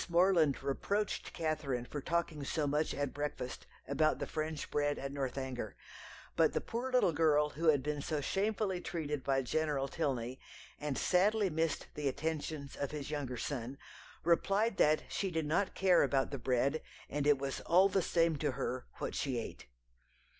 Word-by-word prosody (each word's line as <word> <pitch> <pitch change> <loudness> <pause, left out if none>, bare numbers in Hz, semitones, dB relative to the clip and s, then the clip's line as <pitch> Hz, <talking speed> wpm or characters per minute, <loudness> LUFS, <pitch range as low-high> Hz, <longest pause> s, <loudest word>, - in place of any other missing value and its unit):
Morland 170 -6 +4
reproached 200 +9 -1
Catherine 155 -7 -2
for 145 +3 -5
talking 165 -2 -1
so 150 +2 -1
much 150 +2 +1
at 140 -1 -2
breakfast 145 -3 -4 0.2
about 145 +3 +2
the - - -3
French 155 -1 -4
bread 145 0 +1
at 135 0 -4
Northanger, 130 -5 -3 0.6
but - - +4
the - - +1
poor 245 +3 -4
little 250 -8 +4
girl 150 -1 +4
who 165 +3 -2
had 145 -4 +5
been 150 0 -2
so 155 +1 -1
shamefully 195 +3 0
treated 150 -6 -3
by 135 0 +1
General 145 0 0
Tilney, 130 -5 -2 0.4
and 145 -2 -2
sadly 200 +1 +3
missed 160 0 0
the 150 -1 -2
attentions 145 0 -3
of 140 - -2
his 150 -1 -5
younger 135 -4 -3
son, 130 0 -4 0.5
replied 195 +6 +2
that 155 +1 +4
she 195 - -1
did 160 -3 -1
not 170 +7 +1
care 185 -2 +5
about 135 -1 +2
the 140 - -3
bread, 130 +5 +1 0.3
and 145 0 -1
it 145 -1 +6
was 135 0 -3
all 185 +3 +5
the 195 -1 +1
same 165 -2 +2
to 145 -1 0
her 125 0 -3
what - - -4
she 130 -4 -1
ate. 115 - -6
150 Hz, 170 wpm, -34 LUFS, 140-170 Hz, 0.6 s, it